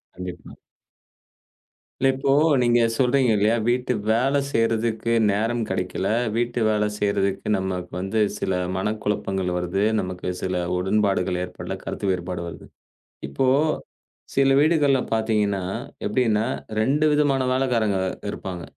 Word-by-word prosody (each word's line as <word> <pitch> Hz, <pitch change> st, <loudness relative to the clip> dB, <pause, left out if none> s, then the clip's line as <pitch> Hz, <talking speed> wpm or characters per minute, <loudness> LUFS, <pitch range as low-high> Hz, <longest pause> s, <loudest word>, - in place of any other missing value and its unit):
கண்டிப்பா. 90 Hz, -1 st, -8 dB, 1.4 s
இல்லை, 135 Hz, -, +3 dB
இப்போ 135 Hz, 0 st, 0 dB, 0.3 s
நீங்க 120 Hz, 0 st, +3 dB, 0.2 s
சொல்றீங்க 130 Hz, +1 st, +2 dB
இல்லையா, 105 Hz, +2 st, +3 dB
வீட்டு 125 Hz, +1 st, +1 dB, 0.2 s
வேலை 135 Hz, +5 st, +2 dB
செய்றதுக்கு 115 Hz, -1 st, 0 dB, 0.2 s
நேரம் 115 Hz, +4 st, 0 dB
கிடைக்கல, 90 Hz, +1 st, -2 dB, 0.3 s
வீட்டு 120 Hz, +1 st, -1 dB
வேலை 105 Hz, -1 st, +2 dB
செய்றதுக்கு 100 Hz, -1 st, 0 dB
நமக்கு 95 Hz, +2 st, -3 dB, 0.2 s
சில 95 Hz, -, -1 dB, 0.2 s
மனக்குழப்பங்கள் 95 Hz, -2 st, -2 dB
வருது, 90 Hz, +3 st, -1 dB, 0.2 s
நமக்கு 90 Hz, -1 st, -5 dB
சில 90 Hz, -1 st, -1 dB, 0.2 s
உடன்பாடுகள் 95 Hz, -1 st, +1 dB
ஏற்படல, 90 Hz, -, -6 dB
கருத்து 100 Hz, -, -3 dB
வேறுபாடு 90 Hz, -1 st, -3 dB
வருது. 85 Hz, -, -9 dB, 0.6 s
இப்போ 70 Hz, -, 0 dB, 0.9 s
சில 135 Hz, 0 st, +4 dB
வீடுகள்ல 145 Hz, -4 st, +3 dB
பார்த்தீங்கன்னா 105 Hz, -3 st, 0 dB, 0.4 s
எப்டின்னா, 110 Hz, -1 st, +1 dB, 0.4 s
2 145 Hz, +6 st, +2 dB
விதமான 145 Hz, -3 st, +2 dB
வேலைக்காரங்க 120 Hz, -6 st, +1 dB, 0.3 s
இருப்பாங்க, 90 Hz, -3 st, -6 dB
105 Hz, 110 wpm, -23 LUFS, 95-125 Hz, 1.4 s, சில